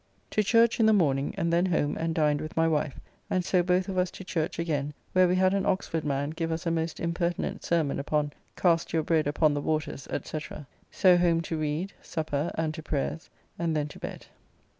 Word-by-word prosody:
To 215 - +2
church 230 +2 +4
in 220 - +5
the 220 - +6
morning, 140 -8 +2
and 170 0 0
then 175 +2 +3
home 155 -5 +1
and 165 0 -2
dined 150 -2 +2
with 155 +1 -7
my 165 0 +4
wife, 155 -3 -1 0.3
and 185 -1 0
so 185 -1 +3
both 180 +1 +1
of 190 -2 -1
us 180 0 +1
to 190 - -10
church 175 -3 -2
again, 150 -3 -2 0.2
where 185 0 +5
we 180 - +2
had 185 +1 +3
an 200 -1 +1
Oxford 165 -4 -1
man 145 0 -1
give 165 0 -3
us 160 +1 -3
a 165 - +1
most 165 0 -2
impertinent 170 +1 -2
sermon 160 -5 +1
upon 145 0 -1 0.2
"Cast 170 -2 +2
your 160 -1 +2
bread 155 -2 +2
upon 150 +1 +3
the 145 - -1
waters, 155 -3 -2 0.2
&c. 155 - -4 0.5
So 180 -2 +5
home 170 -1 +3
to 165 - -4
read, 155 +6 -2
supper, 155 -1 -2
and 160 -1 -1
to 160 - -7
prayers, 155 +2 -3 0.3
and 165 -2 0
then 150 -1 0
to - - -12
bed. - - -7
165 Hz, 215 wpm, -28 LUFS, 150-180 Hz, 0.5 s, the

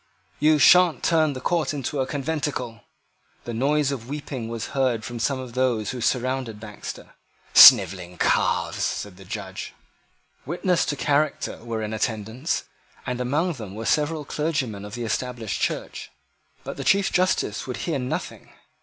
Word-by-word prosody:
"You 155 0 +4
sha'n't 175 +3 +5
turn 155 -3 +3
the 130 - -6
court 160 +2 0
into 140 +1 -3
a 130 - 0
conventicle." 140 -6 -3 0.6
The 120 - -6
noise 140 +4 +1
of 125 -3 -6
weeping 140 -5 -5
was 115 -1 -5
heard 125 -5 0
from 120 -1 -6
some 135 +4 0
of 130 -2 -8
those 120 -5 0
who 125 -2 -6
surrounded 125 -2 -1
Baxter. 105 -1 -9 0.4
"Snivelling 90 -1 +8
calves!" - - +1
said 100 -3 -3
the - - -13
Judge. - - -6 0.7
Witnesses 175 +3 0
to 145 - -1
character 145 +1 0
were 115 -2 -3
in 105 0 -4
attendance, 110 +6 -2 0.4
and 125 0 -3
among 150 +8 0
them 105 -8 -8
were 115 +1 -6
several 150 +2 0
clergymen 135 -10 -2
of 105 +2 -8
the 120 - -4
Established 115 -1 -3
Church. - - -3 0.5
But - - -7
the - - -4
Chief 200 0 +3
Justice 180 - 0
would 125 - -4
hear 160 -5 -1
nothing. 125 0 -5
130 Hz, 155 wpm, -24 LUFS, 115-150 Hz, 0.7 s, Snivelling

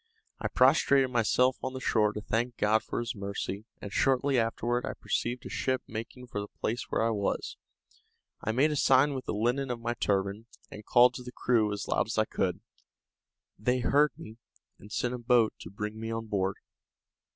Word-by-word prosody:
I - - -1
prostrated 135 -2 +4
myself 125 +2 +3
on 130 - -3
the 130 - -5
shore 105 -4 +2
to 105 - -5
thank 115 +3 -1
God 110 +1 +3
for - - -4
this 120 - -3
mercy, 100 0 -5
and 100 - -8
shortly 135 0 +2
afterward 120 +2 0
I 135 - -3
perceived 120 +1 -2
a - - -6
ship 130 -1 -1
making 115 +3 -7
for 105 -4 -4
the 100 - -6
place 115 +3 -3
where - - +1
I 115 - +2
was. 100 -2 -2 0.9
I 110 - 0
made 140 +7 +3
a - - -1
sign 135 +1 +4
with 130 -1 -5
the - - -2
linen 125 +5 0
of 120 -1 -3
my 120 +1 -2
turban, 100 0 -1 0.2
and 105 - -9
called 125 +3 +5
to 125 - -7
the 125 - -8
crew 115 -4 +1
as 105 - -4
loud - - +1
as 110 - -4
I 110 - +4
could. 95 -2 -2 1.0
They 125 +4 +1
heard 145 +4 +3
me, 110 +1 -10 0.4
and 105 - -14
sent 125 +1 -1
a 125 - -4
boat 120 -2 +3
to - - -9
bring 105 +2 -5
me 115 0 -4
on 115 0 -3
board. 100 -3 -1
115 Hz, 200 wpm, -29 LUFS, 105-125 Hz, 1.0 s, called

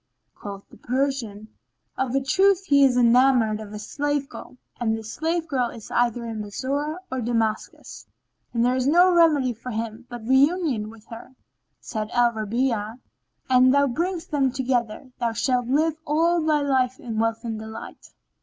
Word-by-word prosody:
Quoth 200 -1 -9
the - - -15
Persian, 250 -5 -2 0.5
"Of 265 -1 -2
a 275 - +2
truth 385 +7 +3
he 280 -4 +4
is 255 -2 +4
enamoured 240 -2 +4
of 215 -2 -9
a 210 - -6
slave 290 +6 -2
girl 255 - -11 0.2
and 225 -2 0
this 220 -1 -8
slave 330 +1 -1
girl 255 -6 0
is 225 - -11
either 240 0 0
in 225 -2 -5
Bassorah 280 - -3
or 260 -1 -2
Damascus; 230 -2 -3 0.4
and 235 0 +1
there 250 +1 +2
is 255 0 0
no 355 +4 +5
remedy 300 -7 +4
for 235 +3 -9
him 230 +1 -5
but 240 -2 -8
reunion 265 -3 +2
with 220 -1 -15
her." 230 +3 -10 0.4
Said 215 -2 -5
Al 240 -1 +4
Rabi'a, 225 0 -2 0.5
"An 255 0 +5
thou 280 +2 +4
bring 340 +8 -1
them 275 -3 +1
together, 250 -2 -2
thou 235 -1 -1
shalt 245 +1 0
live 310 +4 +1
all 335 +3 +2
thy 310 -1 +2
life 260 -2 0
in 225 -3 -4
wealth 225 +1 -1
and 225 -2 -4
delight." 220 0 -10
250 Hz, 170 wpm, -24 LUFS, 225-280 Hz, 0.5 s, no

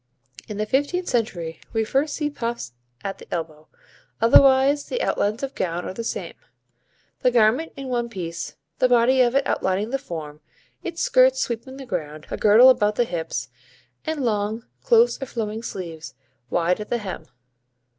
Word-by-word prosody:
In 210 - -6
the 215 - 0
fifteenth 290 +10 0
century 175 -9 -2
we 225 -1 +1
first 280 +6 0
see 295 -1 -2
puffs 235 - -4 0.3
at 195 - -4
the - - -14
elbow, 155 -2 -5 0.5
otherwise 270 +4 +5
the - - -3
outlines 215 - 0
of 275 0 -3
gown 175 - -2
are - - -4
the 230 - -5
same. - - -4 0.9
The 250 - +3
garment 245 +6 +3
in 275 -1 -6
one 240 -2 -1
piece, 170 -6 -5 0.2
the 255 - +4
body 245 +2 +4
of 245 0 +3
it 275 -1 +3
outlining 200 +2 0
the 270 - 0
form, 155 - -7 0.4
its 340 -1 -3
skirts - - +4
sweeping 260 - -3
the 270 - -8
ground; 155 -8 -5
a - - -2
girdle 220 +5 +7
about 210 -4 +1
the 240 - +2
hips, 170 -7 -4 0.5
and 310 -4 -2
long, 215 +1 -1 0.2
close 470 -7 +4
or 270 - -3
flowing 220 -2 -4
sleeves, 165 -7 -7 0.3
wide 175 +2 +1
at 210 - -7
the 240 - +1
hem. 190 -7 -6
230 Hz, 170 wpm, -23 LUFS, 190-270 Hz, 0.9 s, girdle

